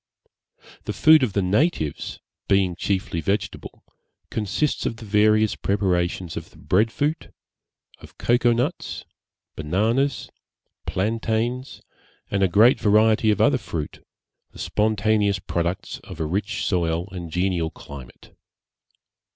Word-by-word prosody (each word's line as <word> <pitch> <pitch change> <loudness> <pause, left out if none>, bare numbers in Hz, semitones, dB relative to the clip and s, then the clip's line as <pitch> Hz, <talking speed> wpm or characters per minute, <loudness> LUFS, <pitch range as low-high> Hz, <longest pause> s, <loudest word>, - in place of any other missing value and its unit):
The - - -3
food 155 -1 +6
of 120 -7 0
the 100 - +1
natives, 95 - 0 0.3
being 95 -3 +2
chiefly 95 -2 -2
vegetable, 100 +4 -3 0.5
consists 110 +7 -1
of - - -3
the 110 - -10
various 105 +1 +3
preparations 90 -3 -1
of - - -6
the - - -20
bread 110 +5 +1
fruit, 150 +6 -2 0.7
of - - -15
cocoa 120 0 +3
nuts, 125 +9 -2 0.5
bananas, 110 - 0 0.6
plantains, 115 +5 -2 0.5
and 100 - 0
a 95 - +5
great 110 +8 +5
variety 110 +1 +4
of 105 - +2
other - - +4
fruit, 75 -3 -6 0.5
the - - -17
spontaneous 105 -1 +1
products 85 0 -3
of - - -11
a 80 - -1
rich 100 +8 -2
soil 85 -1 0
and 90 -3 -6
genial 90 -1 0
climate. 70 -6 -12
100 Hz, 120 wpm, -23 LUFS, 90-110 Hz, 0.7 s, food